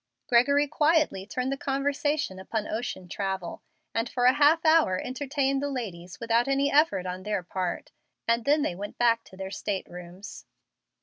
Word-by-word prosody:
Gregory 280 +4 +4
quietly 300 - +1
turned 255 +3 -2
the - - 0
conversation 280 -4 -1
upon 210 +3 -3
ocean 215 -5 -4
travel, 190 -2 -4 0.3
and 230 +1 -1
for 245 -1 0
a 250 - +7
half 305 +4 +4
hour 315 - +4
entertained 275 +1 -1
the 285 - -1
ladies 185 -9 -6
without 230 +1 +2
any 275 +1 +2
effort 285 - +3
on 180 0 -4
their 210 -2 -2
part, 180 0 -4 0.4
and 230 0 +2
then 295 +1 +3
they 180 - -1
went 200 +4 -7
back 230 -1 +3
to 190 - -16
their 190 0 -6
state 200 -1 -3
rooms. 180 +3 -10
235 Hz, 170 wpm, -27 LUFS, 190-280 Hz, 0.4 s, a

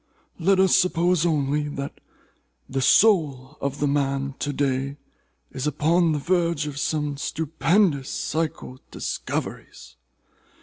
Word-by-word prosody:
Let 190 +3 +3
us 190 -1 +5
suppose 175 -2 +2
only, 150 -1 0
that 140 -1 -6 0.7
the 135 0 -2
soul 145 - +3
of 140 +1 -3
the 145 - +1
man 140 -1 0
of 140 - -13
to 145 - -2
day 135 0 -1 0.5
is 130 +3 -3
upon 160 +4 +2
the - - 0
verge 170 -1 0
of 145 -2 -5
some 150 -1 -1
stupendous 160 0 +1
psychal 155 -5 -3
discoveries. - - -5
150 Hz, 125 wpm, -24 LUFS, 140-170 Hz, 0.7 s, us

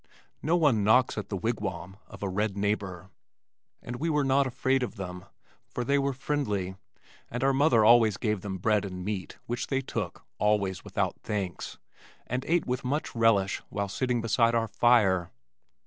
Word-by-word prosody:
No 160 +4 +2
one 140 -11 +3
knocks 115 +4 +4
at 105 -2 -5
the 100 - -2
wigwam 95 -4 -3
of - - -10
a - - 0
red 100 +1 -1
neighbor, 100 -2 -2 0.7
and 120 0 -5
we 165 +6 -1
were 150 -2 +2
not 135 0 +3
afraid 130 +1 +1
of 125 -2 -3
them, 90 -2 -7 0.4
for 125 - -4
they 140 +4 +2
were 140 0 +1
friendly, 110 -9 -2 0.5
and 120 +2 -3
our 135 0 +3
mother 135 -6 +4
often 115 -1 +7
gave 105 -4 -1
them 95 -1 -4
bread 105 +2 +2
and 90 -2 -6
meat 100 -3 -4
which 120 +1 -3
they 135 -1 0
took 135 - -5
(always 100 -3 +1
without - - -2
thanks) 100 -4 -4 0.5
and 125 +2 -2
ate 170 0 +2
with 125 +1 -2
much 140 +4 -2
relish 110 -4 +3
while 100 -1 -2
sitting 125 +4 -1
beside 115 +1 +2
our 115 -1 +1
fire. 100 -6 +3
110 Hz, 175 wpm, -28 LUFS, 100-130 Hz, 0.7 s, often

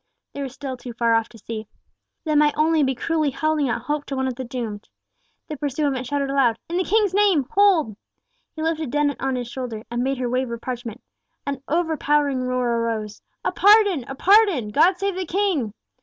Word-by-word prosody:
They 280 - -5
were 275 - -3
still 265 0 -6
too 245 -1 -8
far 235 -1 +2
off 225 0 +1
to 230 - -15
see. 220 0 -7 0.6
They 310 - -1
might 295 0 +3
only 315 +1 +3
be 265 -2 +1
cruelly 310 +3 0
holding 300 0 0
out 235 - -2
hope 295 +2 -2
to 275 - -3
one 265 0 -1
of 260 - -2
the 260 +2 -6
doomed. 230 -4 -6 0.6
The 305 - -6
pursuivant 275 -2 -1
shouted 280 -1 -1
aloud—"In 275 +5 +1
the 370 - +2
King's 410 0 +2
name, 390 -8 +3
Hold!" 365 - +3 0.6
He 315 - -4
lifted 320 -3 -1
Dennet 290 +1 0
on 265 -1 0
his 245 -1 -3
shoulder, 240 -3 -6
and 240 +1 -1
bade 270 +1 -1
her 250 -1 -2
wave 255 +1 -1
her 235 - -4
parchment. 240 -1 -6 0.4
An 280 -2 -3
overpowering 295 -4 +1
roar 250 -2 0
arose. 220 -2 -3 0.2
"A - - +2
pardon! 405 - +5
a 270 - -6
pardon! 385 - +4
God 330 - +4
save 395 +1 -1
the 375 - -2
King!" 355 - 0
275 Hz, 200 wpm, -23 LUFS, 245-315 Hz, 0.6 s, pardon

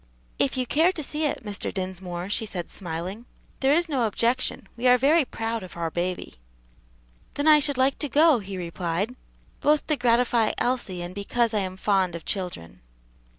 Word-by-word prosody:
"If 140 - +1
you 255 - 0
care 320 +8 +3
to 310 - -4
see 305 +3 -1
it, 270 - -4
Mr. 205 -1 -3
Dinsmore," 185 -2 -4
she 215 +2 -1
said, 175 -4 -5
smiling, 185 +6 -5 0.3
"there 275 +2 +4
is 345 +2 +2
no 260 -7 +1
objection; 240 +4 0
we 240 +2 0
are 250 0 +7
very 295 +6 +4
proud 225 -1 -3
of 180 -2 -10
our 165 -1 -2
baby." 175 - -3 1.0
"Then 285 +2 0
I 305 -1 +8
should 285 -2 +1
like 265 +1 +2
to 295 - -2
go," 300 0 +5
he 195 -2 -7
replied, 180 +5 -3 0.4
"both 300 0 +2
to 305 - +1
gratify 235 -2 +2
Elsie 240 -8 -1
and 175 +1 -6
because 230 +3 0
I 210 - +2
am 185 -1 -3
fond 190 -3 +1
of 170 - -8
children." 180 - -4
225 Hz, 185 wpm, -25 LUFS, 185-260 Hz, 1.0 s, I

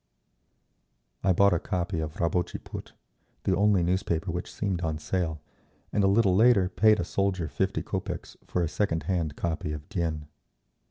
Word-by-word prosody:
I 95 - +4
bought 100 +2 +5
a 85 - +2
copy 90 0 -2
of 80 0 -4
Rabotchi 90 +1 0
Put, - - -9 0.5
the - - +2
only 100 -3 +3
newspaper 85 -1 0
which 90 +1 -4
seemed 95 -4 -2
on 80 -2 -1
sale, 80 -2 -2 0.5
and 105 - +2
a - - +5
little 100 -2 +4
later 105 -3 +5
paid 110 +2 +4
a - - +1
soldier 95 -3 0
fifty 95 +5 -1
kopeks 95 -3 -4
for 90 - 0
a - - +1
second 80 -2 -1
hand 80 -3 -1
copy 80 -2 -2
of 75 0 -7
_Dien. 85 -6 -2
90 Hz, 165 wpm, -28 LUFS, 80-100 Hz, 0.5 s, bought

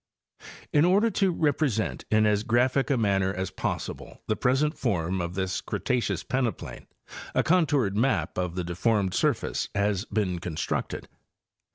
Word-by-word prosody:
In 150 - +5
order 200 +6 +4
to 195 -1 +2
represent 145 -8 0
in 110 0 +4
as 105 -1 +3
graphic 125 +5 +2
a 135 - +2
manner 95 -4 +2
as 95 0 -3
possible - - -5
the 110 - 0
present 140 +7 +1
form 95 -6 -1
of 85 +1 -4
this 95 0 -1
Cretaceous 110 -8 -1
peneplain 130 -3 -3 0.5
a - - +3
contoured 150 - +2
map 105 - +1
of 90 -1 -2
the 90 - -2
deformed 95 +2 0
surface - - 0
has 100 0 +1
been 95 -7 -1
constructed. 85 -3 -3
110 Hz, 145 wpm, -27 LUFS, 95-135 Hz, 0.5 s, In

